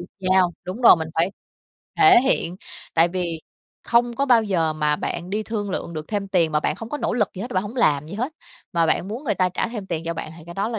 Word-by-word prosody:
được 175 - -8 0.2
giao 185 -2 +4
đúng 185 +6 -6
rồi, 230 - +9
mình 160 -1 -4
phải 170 +3 +1 0.7
thể 390 -10 +8
hiện, 185 -9 0 0.4
tại 165 +1 +5
vì 170 -3 -3 0.4
không 240 0 +2
có 280 0 +1
bao 235 -3 +5
giờ 170 -6 0
mà 150 -1 0
bạn 175 +4 -4
đi 210 +2 -1
thương 210 -3 -4
lượng 170 - -4
được 155 -1 -6
thêm 200 -2 -2
tiền 170 -4 +2
mà 150 - +2
bạn - - -1
không 225 - -8
có 295 - -4
nỗ - - -1
lực 210 -5 +1
gì 190 - -6
hết, 245 - -6
bạn 185 - +1
hổng 215 +5 -8
làm 150 - +2
gì 165 - -8
hết 250 +9 -3 0.4
mà 170 -1 +2
bạn 170 +3 +1
muốn 235 +8 -6
người 210 -7 0
ta 185 -1 +2
trả 185 - -2
thêm 215 -5 -6
tiền 165 -3 -3
cho 170 - -2
bạn, 155 - -6
thì 160 - -12
cái 170 - -9
đó 200 +3 -1
là 225 -2 -3
190 Hz, 275 wpm, -23 LUFS, 170-225 Hz, 0.7 s, rồi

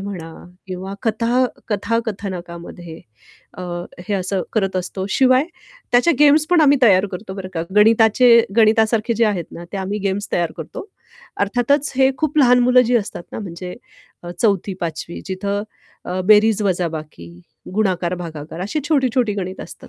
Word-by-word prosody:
म्हणा 180 -5 -7 0.3
किंवा 190 +1 -6
कथा 230 +3 +1 0.2
कथाकथनकामध्ये 190 -6 -4 0.6
अ, - - -5 0.5
हे 205 - 0
असं 190 0 -1
करत 195 -3 0
असतो. 185 +1 -4
शिवाय 260 +3 +4 0.5
त्याच्या 250 +8 +4
गेम्स 300 +1 +5
पण 350 -2 +5
आम्ही 285 -1 +5
तयार 200 -3 +5
करतो, 190 +1 -7
बरं 190 -1 -6
का 165 - -1
गणिताचे 225 +3 +5 0.3
गणितासारखे 225 +1 +3
जे 230 +1 +2
आहेत 190 -5 -1
ना 170 - -9
ते - - -3
आम्ही 195 +2 -3
गेम्स 200 +1 -2
तयार 170 -2 0
करतो. 160 - -8 0.5
अर्थातच 245 +7 +1
हे 265 0 +4
खूप 310 -1 -1
लहान 250 -2 +6
मुलं 250 +1 +5
जी 245 0 +3
असतात 200 -5 -3
ना, - - -5
म्हणजे 180 -2 -7 0.5
अ, 175 - -7
4थी-5वी 180 -5 -2
जिथं 200 +2 -2 0.4
अ, 185 +1 -3
बेरीज 215 0 +5
वजाबाकी, 160 - -3 0.5
गुणाकार 185 -4 0
भागाकार 160 -1 -8
अशी 210 +11 -2
छोटी-छोटी 255 -7 +1
गणित 185 -1 -5
असतात. - - -11
205 Hz, 150 wpm, -19 LUFS, 180-235 Hz, 0.6 s, लहान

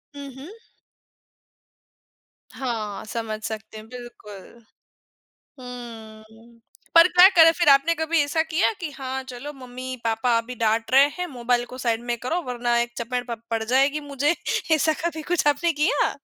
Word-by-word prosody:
हुँ, 280 -1 -8
हुँ। 290 +7 -10 2.0
हाँ, 220 -6 -4
समझ 220 -1 -4
सकते 220 0 -6
हैं, 215 +1 -11
बिल्कुल। 235 -2 -12 1.0
हम्म, 230 -2 -11 0.3
पर 335 +1 +8
क्या 360 +1 +8
करें 330 -1 +9
फिर? 340 -3 0
आपने 275 +4 +5
कभी 320 0 0
ऐसा 320 +2 0
किया 320 +5 +1
कि 325 -4 -4
हाँ, 265 -1 -5
चलो 260 +4 -7
मम्मी-पापा 250 -3 -2
अभी 240 +2 -6
डाँट 225 0 0
रहे 275 +2 +7
हैं 360 - -2
मोबाइल 245 -4 -1
को 255 - -8
साइड 235 -2 -1
में 240 - 0
करो 325 +10 -2
वरना 240 -1 -1
एक 240 0 -2
चपेट 245 +1 -3
प 235 - -3
पड़ 225 -1 -1
जाएगी 270 +5 +2
मुझे, 290 +2 0 0.4
ऐसा 315 +1 +2
कभी 320 -2 -2
कुछ 345 - +1
आपने 295 +4 +2
किया? 300 -1 +2
250 Hz, 150 wpm, -23 LUFS, 230-295 Hz, 2.0 s, करें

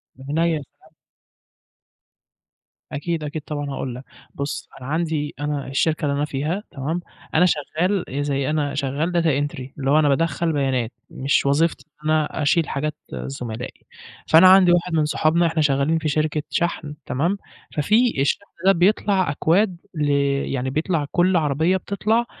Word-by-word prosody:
من 140 +5 -4
عينيا، 165 -1 +2
يا 145 - -6 0.2
سلام. - - -22 2.0
أكيد، 160 +2 -3
أكيد 150 +1 -4
طبعًا 145 -1 -4
هاقول 130 -3 -4
لك، 130 - -9 0.3
بُص 140 +1 -4
أنا 130 - -7
عندي 160 -2 -1
أنا 145 -2 -2
الشركة 155 +3 0
اللي 140 -1 0
أنا 145 - +1
فيها، 150 +8 -2
تمام؟ 150 +6 -3 0.4
أنا 180 +3 +6
شغال 175 +4 0
زي 140 0 -1
أنا 145 -2 0
شغال 140 +4 -1
data 170 -1 +1 0.2
entry - - -9 0.2
اللي 135 0 0
هو 155 - +5
أنا 150 -2 +3
بادخل 165 +2 +1
بيانات، 130 -5 0 0.2
مش 140 +1 0
وظيفتي 155 +4 +1 0.2
إن 155 - -1
أنا 155 0 +1
أشيل 155 +2 +2
حاجات 150 +2 -2 0.2
زملائي، 125 -3 -6 0.4
فأنا 175 +4 +8
عندي 185 -2 +7
واحد 175 0 +1
من 155 -2 +3
صُحابنا 155 +3 +2
إحنا 160 -1 0
شغالين 145 +2 +2
في 155 - -2
شركة 155 +1 0
شحن، 165 -3 -1
تمام؟ 170 +10 0 0.4
ففي 215 - +2
الشحن 140 - +1 0.2
ده 195 - +7
بيطلع 190 -1 +2
أكواد 175 +5 +2 0.2
ل 150 -2 0 0.4
يعني 130 0 -1
بيطلع 155 +2 0
كل 180 +1 +3
عربية 160 +4 +2
بتطلع 215 +5 0
155 Hz, 160 wpm, -22 LUFS, 140-170 Hz, 2.0 s, فأنا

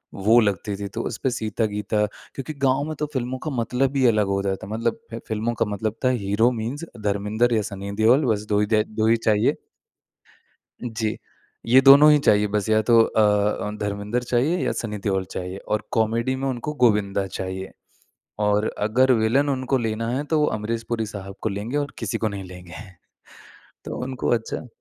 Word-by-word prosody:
वो 110 +5 +4
लगती 100 0 -1
थी 100 - -4
तो - - -1
उस 115 - -5
पे 130 - +3
सीता-गीता 105 -2 -1 0.3
क्योंकि 140 +3 -5
गाँव 135 +2 +2
में 155 - -4
तो 150 - 0
फिल्मों 130 -1 -2
का 155 - -3
मतलब 130 +2 0
ही 130 - +3
अलग 105 -2 +3
हो 100 0 0
जाता 95 -1 -3
मतलब 115 +2 -2
है 115 - -4
फिल्मों 110 +2 -1
का - - +3
मतलब 105 +1 -3
था - - +5 0.2
हीरो 110 +5 +3
मीन्स 140 +9 -4 0.2
धर्मेन्द्र 105 +4 0
या 110 - +2
सनी 100 0 -6
देओल 130 +6 +5
बस 105 0 -5
2 105 0 +2
ही 105 - +2
द 105 - +3 0.2
2 110 - +3
ही 115 +1 +4
चाहिए। 105 -1 +3 1.3
जी। 110 -2 -2 0.5
ये 130 +3 +7
दोनों 140 +3 +8
ही 150 - +5
चाहिए 105 -6 +3
बस 105 0 -1
या 110 0 +4
तो 115 -1 +7
अ, 110 - 0
अ, 105 0 +1
धर्मेन्द्र 105 +3 -2
चाहिए 130 +9 +1
या - - +1
सनी 105 -3 -4
देओल 95 -2 0
चाहिए 90 +1 -5
और 105 +1 -3
कॉमेडी 115 +3 +1
में 135 +1 -3
उनको 130 +4 -3
गोविन्दा 100 -3 +2
चाहिए। 95 +1 -5 0.7
और 105 0 +2
अगर 125 +5 +3
विलन 125 +6 +2
उनको 130 0 0
लेना 115 -1 -2
है 145 - -2
तो 155 +1 0
वो 150 - +3
अमरीश 115 +2 -3
पुरी 115 -2 -1
साहब 100 -2 -8
को 110 - -1
लेंगे 105 +8 -3
और 145 -1 -3
किसी 115 -4 -2
को 110 - -1
नहीं 100 -2 -5
लेंगे 90 -2 -11 1.1
तो - - -5
उनको 130 0 -3
अच्छा 115 +2 -3
110 Hz, 195 wpm, -23 LUFS, 105-125 Hz, 1.3 s, दोनों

